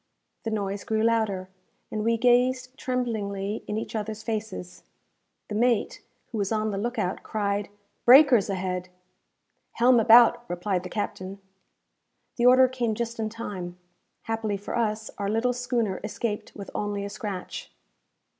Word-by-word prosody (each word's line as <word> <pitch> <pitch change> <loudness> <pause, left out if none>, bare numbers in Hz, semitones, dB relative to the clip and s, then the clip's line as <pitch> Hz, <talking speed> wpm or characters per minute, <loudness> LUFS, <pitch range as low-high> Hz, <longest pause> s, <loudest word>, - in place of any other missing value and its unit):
The - - 0
noise 200 -2 -2
grew 220 0 0
louder, 220 -5 +1 0.4
and 215 -1 -2
we 230 +1 +2
gazed 255 +2 +2
tremblingly 215 -6 -2
in 210 - -2
each 225 - -5
others 215 0 -4
faces. 220 -5 -5 0.7
The - - -6
mate, 235 +1 +1 0.3
who 225 - -3
was 200 0 -1
on 215 -1 0
the 195 - -2
look 240 +4 -3
out, 190 -3 -1
cried 205 -1 -2 0.4
"Breakers 250 -5 +7
ahead!" 185 -1 -2 0.8
"Helm 245 +1 +5
about!" 235 +1 +7
replied 180 +1 -1
the 180 - -7
captain. 195 -2 -4 1.0
The 240 0 +4
order 255 +1 +7
came 245 -4 -1
just 235 0 -4
in 220 -1 -1
time. 190 -6 -6 0.5
Happily 220 -2 -2
for 200 - -6
us, 220 -2 -1
our 200 -1 -1
little 225 +4 +1
schooner 240 -5 -1
escaped 210 -3 -4
with 200 -2 -8
only 205 -1 -2
a - - -3
scratch. 205 -4 -6
220 Hz, 145 wpm, -26 LUFS, 200-235 Hz, 1.0 s, Breakers